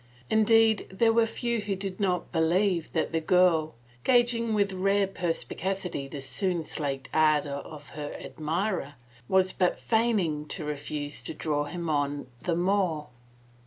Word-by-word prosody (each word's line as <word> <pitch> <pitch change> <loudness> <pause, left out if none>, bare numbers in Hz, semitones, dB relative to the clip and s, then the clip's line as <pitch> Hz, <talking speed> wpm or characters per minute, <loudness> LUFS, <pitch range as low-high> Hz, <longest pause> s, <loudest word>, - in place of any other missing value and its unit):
Indeed, 220 0 +4
there 225 +4 +3
were 230 0 +4
few 235 0 -1
who 205 -1 -2
did 190 -1 -5
not 180 -4 0
believe 175 +1 +1
that - - 0
the 165 0 0
girl, 165 -4 +3 0.3
gauging 235 -2 +3
with 200 -2 +1
rare 195 +2 +2
perspicacity 180 -3 -3
the 140 0 -7
soon 180 +3 -1
slaked 140 -3 -3
ardor 155 -2 +3
of 145 -1 -10
her 145 -1 -6
admirer, 160 -1 -2 0.3
was 190 0 +3
but 180 -1 +1
feigning 200 -10 +1
to 160 -1 -5
refuse 145 0 -4
to - - -7
draw 145 -2 -1
him 170 +3 -5
on 145 -1 0 0.2
the 175 -2 0
more. 175 -5 +1
180 Hz, 145 wpm, -28 LUFS, 150-200 Hz, 0.3 s, Indeed